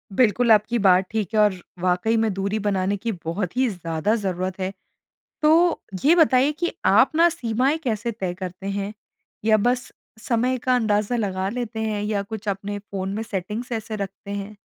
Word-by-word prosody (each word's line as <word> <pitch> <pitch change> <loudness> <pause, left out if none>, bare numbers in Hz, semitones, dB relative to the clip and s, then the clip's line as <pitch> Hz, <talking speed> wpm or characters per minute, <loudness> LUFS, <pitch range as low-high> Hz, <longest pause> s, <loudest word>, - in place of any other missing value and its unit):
बिलकुल 235 -1 +3
आपकी 215 +3 +4
बात 190 -1 +5
ठीक 215 -5 -1
है 215 - +3
और 210 -2 +5 0.3
वाक़ई 185 +5 +1
में 220 -3 +1
दूरी 200 +3 -1
बनाने 195 0 0
की 230 +3 -3
बहुत 180 +5 -3
ही 260 -1 +3
ज़्यादा 170 +3 -1
ज़रूरत 185 -2 -3
है। 185 +1 -2 0.7
तो 330 +3 +4 0.2
ये 320 +4 +7
बताइए 285 -3 +4
कि 345 +3 -2 0.2
आप - - +6
न 340 +1 +6
सीमाएँ 260 0 0
कैसे 230 0 -1
तय 185 -5 -3
करते 185 +1 -7
हैं 200 +1 -3 0.5
या 220 -1 +5
बस 245 +4 0 0.3
समय 250 +1 +1
का 255 - +4
अंदाज़ा 215 0 +1
लगा 190 -3 -1
लेते 230 -1 -4
हैं 215 -2 -1
या 210 -1 -1
कुछ 215 +1 -7
अपने 200 +1 -3
फ़ोन 195 -1 -5
में 220 - -2
सेटिंग्स 220 +3 -4
ऐसे 220 -1 -3
रखते 200 +1 -6
हैं? 200 +1 -5
210 Hz, 180 wpm, -23 LUFS, 195-235 Hz, 0.7 s, ये